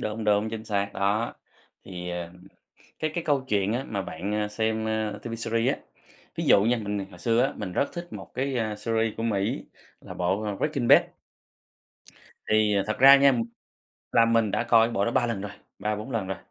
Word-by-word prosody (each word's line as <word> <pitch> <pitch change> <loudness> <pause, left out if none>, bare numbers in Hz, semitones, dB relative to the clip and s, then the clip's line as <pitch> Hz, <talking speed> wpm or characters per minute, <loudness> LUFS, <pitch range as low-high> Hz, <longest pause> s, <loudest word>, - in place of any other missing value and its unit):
Đúng, 110 +1 -3
đúng, 105 +1 +2
chính 110 0 -6
xác! 100 -2 -1
Đó, 100 +4 0 0.5
thì, 90 -2 -6
à, 85 -1 -5 0.7
cái 155 -1 -1
cái 170 - -2
câu 140 -4 +1
chuyện 100 -1 +1
á 125 +4 -2
mà 100 -3 -2
bạn, 95 +4 -5
ơ, 105 - -2
xem, 110 +1 -1
ơ, 110 -1 -2
TV 115 +1 -5
series 115 +2 0
á, - - -13 0.6
ví - - -2
dụ 100 - +6
nha, 120 +2 +3
mình 100 -2 -3
hồi - - -13
xưa 115 +1 +2
á, 135 - +1
mình 100 -4 -5
rất 140 - +1
thích 175 0 -6
một - - -8
cái, 135 0 -1
ơ, 110 -2 -1
series 115 0 -1
của 115 - -4
Mỹ 100 -4 -1 0.4
là - - -10
bộ, 95 +4 0
ờ, 105 -2 -3
Breaking 140 -3 -1
Bad. - - +8 1.5
Thì, 110 -1 +3
ờ, 100 - +2
thật 110 - -2
ra 135 +2 +9
nha, 140 0 +5 0.8
là 115 - +5
mình 115 -2 +2
đã - - 0
coi 115 -1 +5
cái 120 - -6
bộ 100 -1 +1
đó 115 - 0
3 120 - +2
lần 105 -5 -3
rồi, 105 - -6 0.3
3-4 105 +4 -3
lần 110 -5 -2
rồi. 95 - -3
110 Hz, 215 wpm, -26 LUFS, 100-115 Hz, 1.5 s, ra